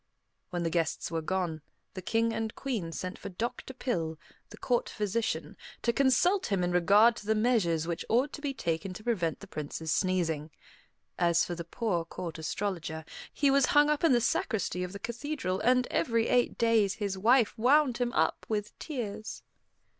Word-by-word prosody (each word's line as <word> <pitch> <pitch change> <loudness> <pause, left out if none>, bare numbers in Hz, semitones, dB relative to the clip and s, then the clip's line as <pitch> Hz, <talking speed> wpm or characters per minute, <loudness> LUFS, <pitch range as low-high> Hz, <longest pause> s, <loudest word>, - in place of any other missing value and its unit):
When 175 -3 -2
the 165 - -1
guests 165 -1 -1
were 165 -1 -1
gone, 170 -2 -2 0.3
the 185 - -6
King 225 +4 +1
and 225 -1 -3
Queen 225 -12 -3
sent 185 +3 -5
for - - -6
Doctor 235 +7 -4
Pill, 170 -12 -2 0.3
the 210 - -12
court 240 +1 0
physician, 215 +2 -2 0.3
to 235 - +2
consult 280 +9 +3
him 195 -4 0
in 175 - 0
regard 205 +6 +5
to 205 - -10
the 220 - +3
measures 210 -9 +2
which 170 -1 -3
ought 255 +5 +2
to - - -7
be 285 -2 -1
taken 180 -5 -3
to 215 - -9
prevent 180 -9 -1
the - - -10
Prince's 155 +1 -5
sneezing. 165 -5 0 0.7
As 170 -1 +3
for 175 - -4
the 170 0 -5
poor 175 0 -1
Court 165 -1 -7
Astrologer, 160 -2 -3 0.3
he 280 -2 +2
was 275 -1 +4
hung 295 +1 +6
up 300 - -1
in 330 - +5
the 240 -2 +4
sacristy 200 -5 0
of 180 - -5
the 200 - -6
cathedral, 235 -3 -3
and 250 +2 +3
every 230 -1 +1
eight 245 -1 +2
days 225 -4 +3
his 200 -3 -2
wife 230 +4 +3
wound 255 +2 +3
him 245 -1 0
up, - - 0
with 210 -1 -2
tears. 215 -8 -5
210 Hz, 185 wpm, -30 LUFS, 175-240 Hz, 0.7 s, hung